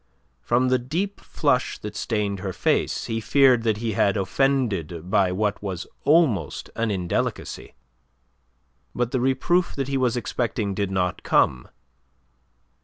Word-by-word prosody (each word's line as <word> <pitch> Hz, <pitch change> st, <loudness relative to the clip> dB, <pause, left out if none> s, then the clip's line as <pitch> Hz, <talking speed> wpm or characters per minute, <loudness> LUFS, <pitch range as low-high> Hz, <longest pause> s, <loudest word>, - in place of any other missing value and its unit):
From 120 Hz, -, +2 dB
the 130 Hz, 0 st, +3 dB
deep 175 Hz, +11 st, -3 dB
flush 140 Hz, -5 st, 0 dB
that 105 Hz, 0 st, -8 dB
stained 105 Hz, -3 st, -1 dB
her 95 Hz, -1 st, -4 dB
face, -, -, 0 dB
he 115 Hz, 0 st, -2 dB
feared 130 Hz, +1 st, +4 dB
that 110 Hz, -2 st, +1 dB
he 115 Hz, +1 st, -2 dB
had 100 Hz, 0 st, +2 dB
offended 95 Hz, -, 0 dB
by 100 Hz, -4 st, +3 dB
what 105 Hz, +2 st, -1 dB
was 95 Hz, -4 st, -4 dB, 0.2 s
almost 150 Hz, -9 st, +2 dB
an 115 Hz, -1 st, 0 dB
indelicacy. 90 Hz, -4 st, -3 dB, 1.2 s
But 120 Hz, 0 st, -1 dB
the 130 Hz, -, 0 dB
reproof 150 Hz, +8 st, +1 dB
that 135 Hz, -1 st, -2 dB
he 135 Hz, -, 0 dB
was 125 Hz, -2 st, +1 dB
expecting 115 Hz, -3 st, -2 dB
did 100 Hz, 0 st, -1 dB
not 90 Hz, -1 st, -1 dB
come. 60 Hz, -2 st, +2 dB
115 Hz, 140 wpm, -24 LUFS, 100-130 Hz, 1.2 s, feared